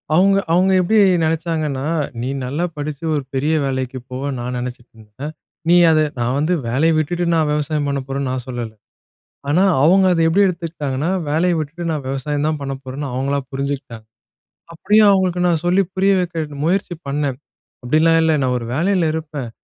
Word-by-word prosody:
அவுங்க 195 +2 +4
அவுங்க 185 +2 +3
எப்டி 215 +5 +2 0.3
நெனைச்சாங்கன்னா, 155 -4 -1 0.4
"நீ 130 - -2 0.2
நல்லா 145 +7 -2
படிச்சு 145 +1 -5
ஒரு 145 - -1
பெரிய 145 +4 0
வேலைக்கு 130 -1 -3
போவேன்னு 135 +1 -3
நான் 125 +1 -4
நெனைச்சிட்டு 120 -1 -6
இருந்தேன்." 110 +8 -9 0.4
நீ 175 - +6 0.2
அதை 155 -1 +4 0.2
"நான் 120 +2 0
வந்து 155 +5 +1
வேலையை 155 +7 +2
விட்டுட்டு 175 +3 -1
நான் 155 -2 +2
விவசாயம் 150 0 -1
பண்ண 140 0 -1
போறேன்னு," 135 -1 -2
நான் 130 -2 -4
சொல்லலை. 120 -3 -5 0.7
ஆனா, 175 +6 +3 0.2
அவுங்க 190 +4 +5
அதை 165 - +1
எப்டி 195 +5 +3
எடுத்துக்கிட்டாங்கன்னா, 160 -4 -3 0.2
வேலையை 170 +3 +2
விட்டுட்டு 160 +3 -5
நான் 145 -4 -3
விவசாயம் 145 +2 -2
தான் 155 -1 -1
பண்ண 135 0 -3
போறேன்னு, 135 +2 -5
அவுங்களா 140 +2 0
புரிஞ்சுகிட்டாங்க. 135 -5 -4 0.7
அப்டியும் 210 +5 +4
அவங்களுக்கு 185 -2 +1
நான் 165 -1 +1
சொல்லி 185 +3 +3
புரிய 195 +1 +3
வைக்க 160 -5 -3
முயற்சி 185 +1 0
பண்ணேன். 140 -2 -1 0.5
"அப்டிலாம் 165 +4 +4
இல்ல 160 -1 +3
நான் 125 -1 +1
ஒரு 115 - -7
வேலையில 175 0 +1
இருப்பேன், 150 -6 -5
150 Hz, 165 wpm, -19 LUFS, 135-170 Hz, 0.7 s, நீ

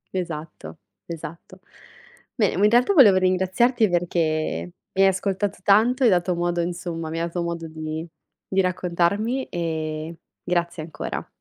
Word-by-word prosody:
Esatto, 165 -3 -6 0.3
esatto. 170 +2 -9 0.8
Bene, 210 -6 +1
ma 205 - +4
in - - +6
realtà 245 - +4
volevo 215 - +7
ringraziarti 190 +5 +2
perché 175 0 0 0.7
mi 195 - 0
hai 195 - +7
ascoltato 195 +1 -1
tanto, 230 +7 +4
hai 235 - +6
dato 180 -1 +2
modo 175 0 0
insomma 170 -2 -4
mi 165 - -3
hai 165 - 0
dato 170 +1 -3
modo 170 -1 -4
di 155 +1 -5 0.5
di 195 - +4
raccontarmi 185 +7 0
e 160 -1 -3 0.3
grazie 170 -2 -1
ancora. 155 -2 -6
175 Hz, 140 wpm, -23 LUFS, 165-195 Hz, 0.8 s, volevo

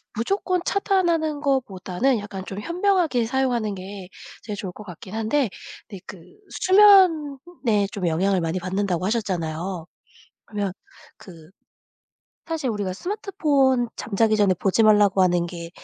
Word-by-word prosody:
무조건 365 - -1
차단하는 340 -7 0
것보다는 245 -3 0
약간 200 -2 -7
좀 195 +1 -6
현명하게 340 - +1
사용하는 240 -5 -1
게 190 0 -9 0.4
제일 210 -2 -5
좋을 185 -2 -5
것 210 - -11
같긴 185 +2 -11
한데 225 +2 0 0.4
근데 195 -4 -10
그 190 - -10 0.3
수면에 330 - +4
좀 195 -6 -3
영향을 185 +4 +1
많이 165 +3 -2
받는다고 185 0 -2
하셨잖아요. 180 -5 -3 0.6
그러면 205 -3 -3 0.5
그 165 -3 -14 1.0
사실 315 -7 -2
우리가 200 -3 -3
스마트폰 285 - 0
잠자기 220 0 +1
전에 195 -3 +3
보지 195 +5 +1
말라고 205 -3 +4
하는 175 -1 +2
게 170 -1 -8
210 Hz, 300 characters per minute, -23 LUFS, 185-285 Hz, 1.0 s, 수면에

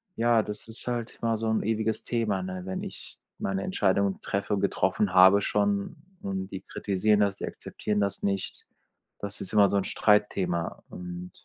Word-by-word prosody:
ja, 115 -1 +4
das 105 +2 -5
ist 115 +2 -2
halt 120 -2 -3
immer 115 -1 +1
so 110 +1 -2
'n 110 - +1
ewiges 110 0 0
Thema, 110 -5 0
ne, 95 0 -5
wenn 95 0 -3
ich - - -7 0.2
meine 95 0 -1
Entscheidung 100 - +1
treffe 100 +1 -2
und 100 - 0
getroffen 95 -1 +1
habe 95 +2 +7
schon 100 -1 0 0.3
und 95 -1 -3
die 95 -1 -6
kritisieren 105 +2 +1
das, 100 -1 +2
die - - -4
akzeptieren 105 -1 -3
das 100 -1 -1
nicht. 100 -1 -2 0.5
Das 100 0 -6
ist 95 - -4
immer 100 -1 +6
so 100 - +1
'n 100 - +1
Streitthema 95 -5 +1
und 90 0 -7
100 Hz, 180 wpm, -28 LUFS, 95-105 Hz, 0.5 s, habe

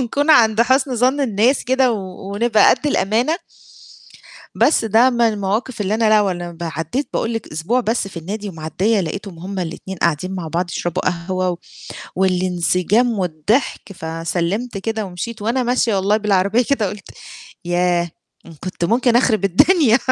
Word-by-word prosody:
ونكون 285 +5 0
عند 225 -6 +5
حسن 260 +1 +1
ظَن 255 +5 +2
الناس 245 +1 +1
كده 260 -1 +2
و 195 -1 -6
ونبقى 220 0 +4
قدّ - - 0
الأمانة. 240 - +1 1.2
بس 300 - +3
ده 225 +4 +4
من 240 -1 -2
المواقف 220 +2 0
اللي 205 +1 0
أنا 220 0 +2
لا 215 0 +5
ولا 175 -4 -2
ب 170 0 -11
عدّيت 165 - -3
باقول 225 - -1
لِك 225 - -5
أسبوع 170 +12 0
بس 225 -3 -1
في 190 - -15
النادي 200 +6 -5
ومعديّة 180 +6 -1
لقيتهم 185 +1 -6
هُم 190 +3 -6
الاتنين 185 +2 -5
قاعدين 170 +3 0
مع 175 -4 -5
بعض 175 +2 -2
يشربوا 175 -1 -3
قهوة 180 0 -2 0.6
والانسجام 185 +5 +1
والضحك، 185 - -1
فسلمت 170 +7 -3
كده 220 +2 -3
ومشيت، 205 +4 -6
وأنا 235 +4 0
ماشية 245 -2 +1
والله 195 +2 +2
بالعربية 210 +2 +2
كده 225 -8 +1
قُلت 205 0 -9 0.5
ياه! 175 0 +1 0.5
كنت 185 -1 -4
ممكن 235 +5 +2
أخرب 225 -5 +2
الدنيا 240 - +4
205 Hz, 150 wpm, -19 LUFS, 180-235 Hz, 1.2 s, عند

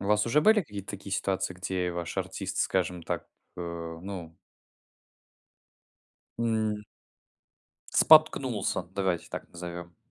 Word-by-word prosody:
У 100 - -5
вас 105 +1 +3
уже 135 +6 +4
были 215 +4 +6
какие-то 100 - -7
такие 100 -1 -7
ситуации, 95 -1 -1
где 90 0 -2
ваш 85 -1 -4
артист, - - -3
скажем 90 -2 +1
так, - - -3 0.3
э, - - -5 0.4
ну 90 -5 -7 2.0
м 110 -2 0 1.1
споткнулся, 140 - +5
давайте 95 -3 0
так - - -6
назовем. 85 -1 -7
95 Hz, 115 wpm, -29 LUFS, 90-110 Hz, 2.0 s, были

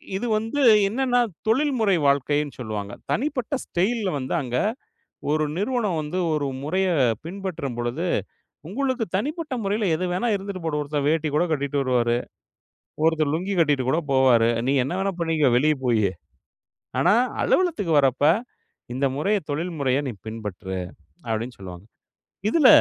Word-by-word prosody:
இது 225 +5 -2
வந்து 225 +7 -2 0.3
என்னென்னா, 245 +2 +1 0.3
தொழில்முறை 230 -5 +2
வாழ்க்கைன்னு 145 +1 +1
சொல்வாங்க. 105 -3 -4 0.2
தனிப்பட்ட 260 -1 -1
ஸ்டைல்ல 200 +3 0
வந்து 130 -1 -3
அங்க 125 -1 -2 0.7
ஒரு 155 0 +2
நிறுவனம் 210 -5 0
வந்து 150 +5 -4 0.2
ஒரு 145 -2 0 0.2
முறைய 185 +5 0 0.4
பின்பற்றம் 175 -8 -4
பொழுது, 120 +9 -2 0.6
உங்களுக்கு 260 +2 -1
தனிப்பட்ட 300 - -2
முறையில 205 +2 0
எது 180 +3 -2
வேணா 215 +7 0
இருந்துட்டு 195 -2 -5
போகட்டும் 150 -2 -1
ஒருத்தன் 145 -1 -2
வேட்டி 160 -1 +1
கூட 165 - +3
கட்டிட்டு 140 -1 -1
வருவாரு. 120 -2 +2 0.9
ஒருத்தர் 160 -3 +2
லுங்கி 185 +5 -1
கட்டிட்டு 145 -5 +3
கூட 160 - +2
போவாரு. 125 -4 +5 0.2
நீ - - +3
என்ன 140 - -3
வேணா 195 0 0
பண்ணிக்கோ 160 -5 +2
வெளியே 155 +3 +3
போயி. 115 -4 +3 1.0
ஆனா, - - +4 0.3
அலுவலகத்துக்கு 330 - +1
வர்றப்ப 135 +1 +2 0.7
இந்த 135 +2 0
முறைய 200 +8 +1
தொழில் 165 +5 -2
முறைய 135 -1 +2
நீ - - -2 0.2
பின்பற்று 105 -4 -5 0.5
அப்டின்னு 115 +2 -3
சொல்வாங்க. 90 -1 -9 0.7
இதில 290 0 +5
160 Hz, 135 wpm, -24 LUFS, 130-205 Hz, 1.0 s, போவாரு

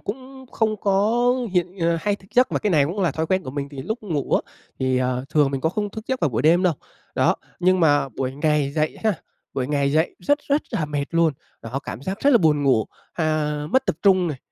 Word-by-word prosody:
cũng 260 +4 -8
không 215 -1 0
có 210 +5 +2 0.3
hiện 180 +1 -1
ờ, 165 0 +2
hay 205 +2 0
thức 190 - -20
giấc, 250 +1 +4
mà - - +1
cái 210 - -1
này 150 -4 +4
cũng 180 +7 -3
là 175 -5 +2
thói 160 0 -2
quen 185 +2 +1
của 130 - -6
mình, 140 +1 -4
thì 135 -2 -7
lúc 220 - -4
ngủ 160 -9 -3
á, - - -1 0.3
thì, 130 -1 +1
ờ, 125 0 -1
thường 150 -3 +3
mình 135 -1 -2
có 160 - +1
không 205 +3 -3
thức 220 +1 -8
giấc 260 -1 -1
vào 155 - +2
buổi 115 +3 -1
đêm 170 +4 +4
đâu, 180 -3 +3 0.4
đó. - - +3 0.3
Nhưng 185 0 +3
mà 145 -3 +3
buổi 130 +2 -4
ngày 150 -1 +1
dậy 155 0 -1
ha, 215 - +4 0.4
buổi 130 -1 -1
ngày 140 -1 0
dậy 160 +2 +1
rất 290 +11 +1
rất 285 +2 +2
là 195 -10 -1
mệt 145 -1 -2
luôn. 165 -2 +3 0.3
Đó, 120 +4 -4
cảm 130 - -7
giác 190 +5 -4
rất 285 - +4
là 240 - +6
buồn 150 -3 +3
ngủ, 130 -6 +3 0.3
à, 155 -2 0
mất 260 - +2
tập - - 0
trung 185 -3 +4
này, 140 -4 -4
160 Hz, 250 wpm, -23 LUFS, 140-200 Hz, 0.4 s, là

